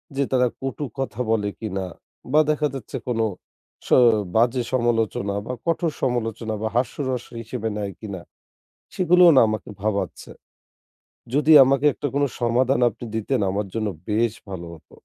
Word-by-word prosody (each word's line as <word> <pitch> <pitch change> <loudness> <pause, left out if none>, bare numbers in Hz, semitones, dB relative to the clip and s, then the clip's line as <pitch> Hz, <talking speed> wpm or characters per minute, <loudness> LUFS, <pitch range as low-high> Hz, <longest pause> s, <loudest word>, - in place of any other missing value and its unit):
যে 140 - +1
তারা 125 -1 +3
কটু 135 +2 -3
কথা 130 -3 -4
বলে 105 -2 +1
কিনা 95 -4 -3 0.5
বা 155 - +5
দেখা 150 0 +2
যাচ্ছে 130 -6 -6
কোন 120 -2 -1 0.7
স - - -9 0.5
বাজে 120 +3 +3
সমালোচনা 115 -4 0
বা 125 - -4
কঠোর 165 -1 0
সমালোচনা 115 -3 -1
বা 110 - 0
হাস্যরস 125 +1 -1 0.2
হিসেবে 115 0 -4
নেয় 100 -1 -3
কিনা? 100 -5 -7 0.7
সেগুলোও 180 -1 +6
না - - +9
আমাকে 110 - -4
ভাবাচ্ছে। 105 -1 -2 1.1
যদি 150 +2 +2
আমাকে 135 +2 +2
একটা 145 - -4
কোনো 140 0 +2
সমাধান 125 +2 +2
আপনি 115 - -11
দিতেন 110 +3 -1
আমার 100 +1 -2
জন্য 110 -2 -1 0.2
বেশ 110 +1 +1 0.2
ভালো 90 -3 -6
হত। 80 - -19
120 Hz, 150 wpm, -23 LUFS, 110-135 Hz, 1.1 s, না